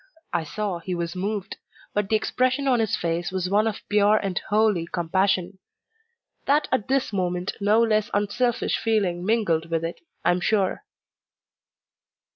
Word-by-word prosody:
I 170 -2 0
saw 195 +3 -3
he 180 +2 -4
was 170 +1 -3
moved; 195 +1 -3 0.4
but 205 -1 -1
the 220 - +3
expression 255 +5 +1
on 250 -3 +3
his 220 -3 +1
face 170 +2 -2
was 185 -1 -2
one 210 +2 +3
of 220 0 -5
pure 210 +1 +4
and 195 -4 -2
holy 210 -5 +2
compassion. 185 +2 0 0.9
That 295 +2 +3
at 260 -6 0
this 265 -4 0
moment 180 -1 -1
no 210 +3 +4
less 215 -2 +1
unselfish 220 +4 0
feeling 195 -6 0
mingled 180 -7 +1
with 165 0 -1
it 165 - -6 0.2
I 175 - +5
am 180 0 0
sure. 200 - +1
200 Hz, 155 wpm, -24 LUFS, 175-220 Hz, 0.9 s, I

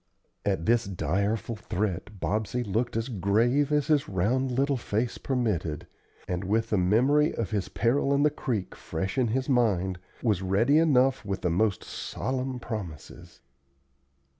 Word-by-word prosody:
At 95 -5 0
this 120 0 +3
direful 100 +6 -1
threat 100 -1 -3
Bobsey 110 +8 -1
looked 115 +3 -1
as 115 +2 -1
grave 120 - +2
as 150 -1 +2
his 150 -1 +2
round 120 +8 +1
little 135 +3 +1
face 115 -1 -2
permitted, 105 - -1 0.4
and, 90 +1 -2
with 110 +4 0
the 105 - +3
memory 130 - +3
of 115 -3 -3
his 100 -3 -1
peril 135 +4 +1
in 140 0 +3
the 150 - +4
creek 120 -9 -3
fresh 95 +4 -4
in 120 -3 +2 0.2
mind, 100 -8 +1 0.2
was 105 -6 +2
ready 110 +11 +3
enough 135 -5 +3
with 95 -2 -3
the 90 - 0
most 100 +3 +1
solemn 130 -1 -3
promises. 100 - -8
110 Hz, 145 wpm, -27 LUFS, 95-130 Hz, 0.4 s, the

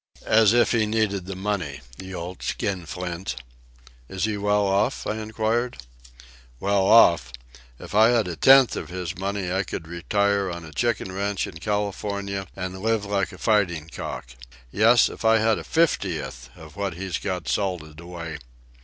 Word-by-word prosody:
As 110 -2 +5
if 120 0 +4
he 110 -3 +2
needed 105 -4 0
the 95 - -5
money! 95 -8 -3 0.2
The 95 0 -7
old 90 +1 -6
skinflint!" 90 -3 -3 0.7
"Is 95 - -4
he 110 -1 0
well 105 0 +1
off?" 100 +6 +1
I 110 - -2
inquired. 110 - -1 0.8
"Well 100 -1 +2
off! 85 - +6 0.5
If - - -10
I 110 +2 +6
had 115 -5 +2
a 85 - -4
tenth 135 +5 +6
of - - -5
his 90 +1 -4
money 95 0 -3
I 95 +1 +1
could 85 -4 -6
retire 100 +3 0
on 85 -1 -6
a 80 - -11
chicken 115 0 -1
ranch 100 +1 -1
in 85 - -9
California 100 -1 -2
and 95 0 -5
live 110 0 0
like 100 -1 -1
a 90 - -11
fighting 90 -8 +1
cock—yes, 65 - 0
if - - -9
I 110 0 +5
had 110 0 +2
a - - -7
fiftieth 90 - -1
of 80 -2 -13
what 100 -3 -3
he's 95 -1 -3
got 95 -3 -4
salted 85 -6 -2
away. 85 -2 -7
100 Hz, 160 wpm, -24 LUFS, 85-105 Hz, 0.8 s, off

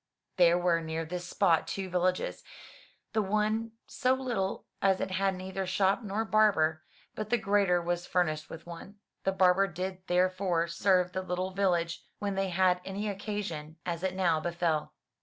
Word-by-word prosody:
There 175 -1 +6
were 175 -2 +2
near 160 0 -3
this 175 +2 -5
spot 175 -6 +2
two 195 -1 -3
villages, 180 0 -1 0.7
the 220 - +2
one 215 +3 0
so 255 -1 +1
little 240 -8 -2 0.2
as 195 -1 +3
it - - -2
had 195 +1 +1
neither 190 +1 -4
shop 190 +3 +2
nor 215 +1 -2
barber, 180 -8 +3 0.3
but 215 -1 -5
the 240 - +3
greater 200 -4 +2
was 175 0 -2
furnished 155 -4 0
with 165 - -9
one. 170 +4 -9 0.3
This 195 - +1
barber 190 +1 +4
did 185 +1 -5
there 180 +1 +3
fore 180 -3 0
serve 180 +1 +2
the 185 - -2
little 185 +1 -2
village 175 -3 0
when 205 -1 -2
they 195 0 -1
had 180 0 +2
any 195 +3 -4
occasion, 195 -6 -5
as 170 -1 -3
it 185 0 -1
now 175 -4 +2
befell. 170 -2 -1
185 Hz, 170 wpm, -30 LUFS, 175-195 Hz, 0.7 s, There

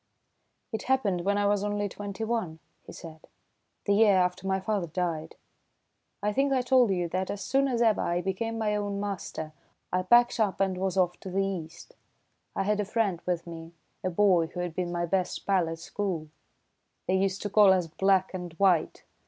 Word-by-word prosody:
"It 220 - -3
happened 210 -10 +2
when 200 +1 +2
I 205 - +1
was 205 0 +2
only 205 0 -1
twenty 205 +2 -6
one," 220 -8 -2 0.3
he - - -8
said, 160 -2 -11 0.6
"the 200 - +3
year 205 -1 +5
after 180 +1 +1
my 190 0 +1
father 195 -2 -1
died. 165 -2 -3 0.9
I 210 0 +1
think 275 +4 +1
I 260 -2 +2
told 250 -2 +4
you 180 -3 0
that 185 +2 -2
as 200 - -4
soon 275 +1 +2
as 240 -3 +1
ever 220 -2 +3
I 175 0 0
became 225 +5 -2
my 215 -2 0
own 205 -1 -2
master, 190 -6 -5 0.4
I 185 - +2
packed 240 +5 +4
up 205 -4 +1
and 195 -1 +1
was 190 0 -1
off 180 -2 +1
to 190 - -8
the 195 +2 0
East. 175 -3 -6 0.6
I - - 0
had 210 +1 0
a - - +2
friend 200 -4 -1
with 175 -2 -1
me, 165 -1 -9 0.3
a 185 - 0
boy 180 -3 +3
who 175 - -6
had 175 -2 -3
been 175 0 -2
my 175 0 -1
best 185 +1 -1
pal 185 -4 +2
at 165 - -5
school. 170 -2 -4 0.8
They 185 - +1
used 195 0 0
to 205 - -3
call 205 -2 +7
us 185 -2 +2
'Black 190 +3 +1
and 180 -2 -6
White.' 180 -1 +2
190 Hz, 200 wpm, -28 LUFS, 175-205 Hz, 0.9 s, call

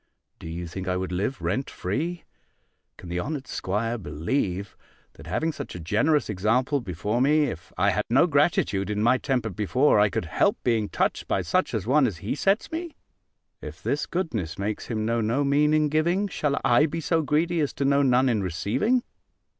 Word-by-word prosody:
Do - - -9
you 85 +2 -5
think 95 +3 -6
I 90 0 0
would 95 0 -3
live 100 +9 -2
rent 130 - -1
free? 165 - -3 0.7
Can - - -11
the 90 +1 -2
honoured 140 - -4
'squire 115 +4 -2
believe, 90 - -2 0.4
that - - -13
having 160 +1 0
such - - -7
a - - -6
generous 110 - +1
example 115 +8 +1
before 105 +4 -2
me, 150 +3 +4
if 115 - -5
I 100 +3 +3
had 105 +3 -1
no 135 +8 +5
gratitude 140 - +1
in 105 0 -1
my 125 +2 +4
temper 125 -6 -1
before, 110 +6 +2
I 105 0 +4
could - - -2
help - - +1
being 115 -4 +1
touched - - -1
by - - 0
such - - 0
an - - 0
one 135 +3 +3
as 100 -7 -4
he 100 +6 -3
sets 195 - +1
me? 330 0 -5 0.7
If - - -9
this - - -1
goodness 125 - -3
makes 105 +2 -3
him 110 -2 -2
know 115 +1 +1
no 115 +6 +1
mean 145 +2 +3
in 155 0 +3
giving, 170 +7 +1
shall 150 -6 -1
I 125 +6 +5
be 165 +2 -4
so 165 +1 +1
greedy 165 +3 +1
as 145 -3 0
to 140 - -2
know 140 +1 +4
none 130 -1 +3
in 115 -5 +1
receiving? 115 - 0
125 Hz, 195 wpm, -25 LUFS, 100-150 Hz, 0.7 s, no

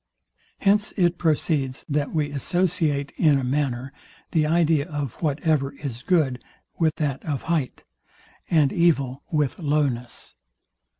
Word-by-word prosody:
Hence 205 +1 +2
it 175 -2 +2
proceeds, 150 -5 0
that 145 -1 -1
we 150 -2 -1
associate, 155 -1 0
in 150 -4 +4
a 135 - -2
manner, 130 -1 -1 0.4
the 155 -2 +2
idea 160 -1 +2
of 145 -5 -3
whatever 150 -2 0
is 135 -4 -6
good 140 -6 +1 0.4
with 160 -2 +2
that 140 -4 -2
of 145 -5 -3
height, 160 -6 -2 0.7
and 155 -5 +3
evil 140 -6 +2
with 150 -2 0
lowness. 145 -6 -1
150 Hz, 125 wpm, -24 LUFS, 135-165 Hz, 0.7 s, in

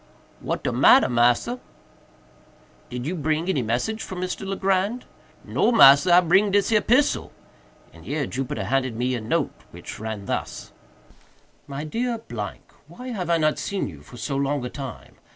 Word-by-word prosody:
"What - - -4
de - - 0
matter, - - +6
massa?" 120 - +2 1.3
"Did 125 0 -5
you 165 - -2
bring 155 +1 -1
any 160 -8 +1
message 125 - -2
from 185 - -6
Mr. 185 +1 -4
Legrand?" 195 +4 0 0.4
"No, - - +1
massa, 175 - +7
I 180 - +7
bring 190 +4 +3
dis 200 0 +2
here 215 -2 +3
pissel;" 255 +7 +2 0.6
and - - -15
here 145 -1 -2
Jupiter 125 -5 -4
handed 130 +2 -1
me 125 +2 -1
a 120 - -3
note 140 +7 -1 0.2
which - - -10
ran 110 -2 -5
thus: - - -4 1.0
"MY 140 +1 -5
DEAR 235 +9 -2 0.7
——Why 255 +1 -9
have 185 -8 -4
I 170 - +3
not 155 -1 +1
seen 200 -1 -2
you 75 -7 -11
for 120 +11 -14
so 140 +4 -3
long 140 -1 -1
a - - -4
time? 135 -2 -9
155 Hz, 165 wpm, -24 LUFS, 125-195 Hz, 1.3 s, massa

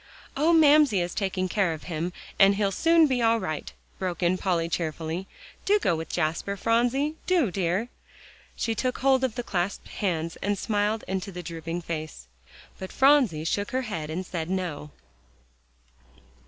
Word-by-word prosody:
"Oh! 310 +4 +3
Mamsie 300 - +5
is 175 0 -2
taking 190 -2 -1
care 185 -3 +1
of 155 - -9
him, 170 0 -3 0.3
and 195 0 +6
he'll 200 -1 +1
soon 330 - +4
be 260 -4 0
all 230 0 +3
right," 155 -7 -4 0.3
broke 180 -2 -3
in 175 +1 +3
Polly 175 -3 0
cheerily. 165 +2 -3 0.4
"Do 410 +1 +4
go 175 - +1
with 160 0 -5
Jasper, 175 +4 -1
Phronsie, 245 +8 +1
do, 340 - +2
dear." 185 +4 0 0.7
She 225 - -1
took 255 +3 -1
hold 265 0 +3
of 255 -4 0
the 245 - -3
clasped 185 -2 -3
hands, 165 -4 -2
and 205 0 -1
smiled 210 +1 0
up - - -14
into 190 +1 -3
the 180 -1 -7
drooping 165 +1 -5
face. 155 - -6 0.5
But 190 - -7
Phronsie 265 - +4
shook 200 +5 -1
her 260 +1 -1
head 165 -10 -4
and 180 +4 -4
said 170 -2 -4
"No." 175 -6 -3
190 Hz, 170 wpm, -26 LUFS, 170-240 Hz, 0.7 s, and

